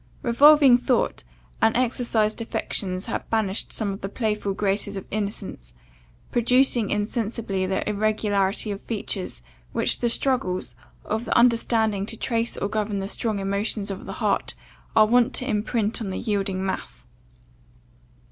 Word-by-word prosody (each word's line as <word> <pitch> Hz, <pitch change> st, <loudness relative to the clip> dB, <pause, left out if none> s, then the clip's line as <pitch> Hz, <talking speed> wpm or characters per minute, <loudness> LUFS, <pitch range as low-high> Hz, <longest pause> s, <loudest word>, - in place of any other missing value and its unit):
Revolving 275 Hz, +1 st, +7 dB
thought, 245 Hz, -, 0 dB, 0.4 s
and 225 Hz, -, +3 dB
exercised 235 Hz, -3 st, 0 dB
affections 185 Hz, -4 st, -2 dB
had 230 Hz, -, -4 dB
banished 215 Hz, -3 st, -1 dB
some 205 Hz, -3 st, 0 dB
of 195 Hz, -, -9 dB
the 195 Hz, -, -4 dB
playful 210 Hz, -3 st, -2 dB
graces 200 Hz, 0 st, -1 dB
of 190 Hz, -, -6 dB
innocence, 200 Hz, -, -5 dB, 0.6 s
producing 245 Hz, -1 st, +3 dB
insensibly 210 Hz, -2 st, -2 dB
that 190 Hz, 0 st, -1 dB
irregularity 210 Hz, -1 st, 0 dB
of 200 Hz, -, -5 dB
features 200 Hz, -, -4 dB, 0.3 s
which -, -, +1 dB
the 240 Hz, -, +1 dB
struggles 230 Hz, -, 0 dB, 0.3 s
of 220 Hz, +3 st, -2 dB
the -, -, +1 dB
understanding 225 Hz, -4 st, +2 dB
to 225 Hz, -, -3 dB
trace 230 Hz, 0 st, -1 dB
or -, -, -1 dB
govern 210 Hz, -1 st, -2 dB
the 195 Hz, 0 st, -3 dB
strong 220 Hz, 0 st, -2 dB
emotions 200 Hz, +1 st, -2 dB
of 195 Hz, -, -7 dB
the -, -, -5 dB
heart, -, -, -1 dB, 0.4 s
are 215 Hz, -, +7 dB
wont 240 Hz, +2 st, +3 dB
to 250 Hz, -, 0 dB
imprint 220 Hz, 0 st, -1 dB
on 205 Hz, -, -3 dB
the 185 Hz, -, -3 dB
yielding 195 Hz, -4 st, -1 dB
mass. 190 Hz, -8 st, -5 dB
215 Hz, 145 wpm, -24 LUFS, 195-230 Hz, 0.6 s, Revolving